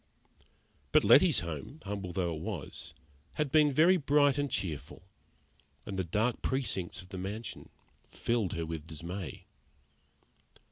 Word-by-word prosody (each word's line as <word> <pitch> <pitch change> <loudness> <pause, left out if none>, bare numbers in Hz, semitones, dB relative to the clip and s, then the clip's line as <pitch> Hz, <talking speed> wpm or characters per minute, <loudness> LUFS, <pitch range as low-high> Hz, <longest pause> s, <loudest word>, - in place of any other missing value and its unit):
But - - +5
Letty's - - +6
home, 85 - -6
humble 100 -2 -4
though 85 -1 -1
it 80 - -6
was, 80 -5 -6 0.4
had 150 -3 -1
been 150 -1 +5
very 170 +7 +5
bright 145 -2 +3
and 145 -1 0
cheerful, 80 - -4 0.8
and 100 - -5
the 95 - 0
dark 105 +8 0
precincts 95 -9 -2
of 90 - -17
the 95 - -6
mansion 105 +4 -6 0.4
filled 115 -6 -1
her 85 0 -2
with 80 -1 -6
dismay. 85 0 -6
95 Hz, 135 wpm, -31 LUFS, 85-130 Hz, 0.8 s, Letty's